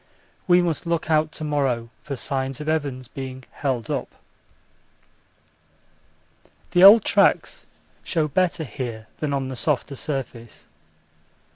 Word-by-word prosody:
We 180 0 +5
must 170 0 -2
look 170 -1 -1
out 155 0 +2
to - - -6
morrow 135 -6 -1
for 140 - -5
signs 135 +1 -2
of 150 - -7
Evans 140 -5 -2
being 130 0 -7
'held 130 -6 -3
up.' - - -4 2.6
The 175 0 +4
old 205 +2 +9
tracks - - +2 0.4
show 160 -3 0
better 175 +2 0
here 115 -3 -6
than 150 -2 -2
on 135 -2 -2
the 130 - -5
softer 140 +1 -1
surface. 120 -3 -6
140 Hz, 125 wpm, -23 LUFS, 130-155 Hz, 2.6 s, old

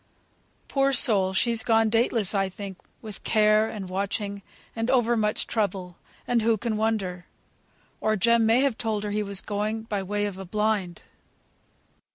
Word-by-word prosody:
Poor 275 0 +2
soul, 205 -6 +3
she's 230 +4 +2
gone 225 -1 +3
dateless, 225 -2 +1
I 195 -1 +1
think, 190 0 -8 0.2
with 215 -3 -7
care, 215 0 +3
and 200 -3 -6
watching, 200 +2 -3 0.3
and 225 +1 -2
over 240 -2 +3
much 215 -1 0
trouble; 190 -5 -2 0.3
and 240 -1 +2
who 225 0 +2
can 225 +1 -2
wonder? 200 -5 -2 0.7
Or 215 0 +1
Jem 235 +3 +3
may 225 +3 +4
have 270 -5 0
told 215 -2 -1
her 210 - -3
he 210 +1 0
was 200 -2 -1
going, 215 +2 -3
by 210 -3 -3
way 205 +2 -2
of 195 -2 -5
a 190 - -6
blind." 210 -2 -1
215 Hz, 165 wpm, -26 LUFS, 200-225 Hz, 0.7 s, may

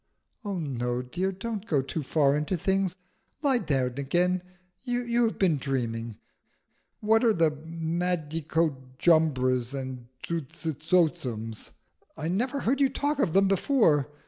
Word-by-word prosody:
"Oh 200 -3 -3
no, 125 -5 -2
dear, 180 +9 -2
don't 210 +2 -5
go 145 -8 +2
too 155 +4 -4
far 140 0 +2
into 150 +5 -1
things. 190 +1 0 0.5
Lie 270 -4 +3
down 130 - -1
again. 175 +6 +1 0.4
You 245 -1 +1
have 225 - -2
been 170 -7 +2
dreaming. 115 -5 -3 0.8
What 220 +2 +3
are 230 -2 +5
the 165 -4 +3
Madicojumbras 155 -5 0
and 130 -2 -7 0.2
Zuzitotzums? 155 - -1 0.5
I 155 - -3
never 250 +10 -1
heard 270 +4 +1
you 275 - +5
talk 290 +1 -1
of 185 - +1
them 195 0 +5
before. 190 - +3
160 Hz, 125 wpm, -27 LUFS, 135-195 Hz, 0.8 s, are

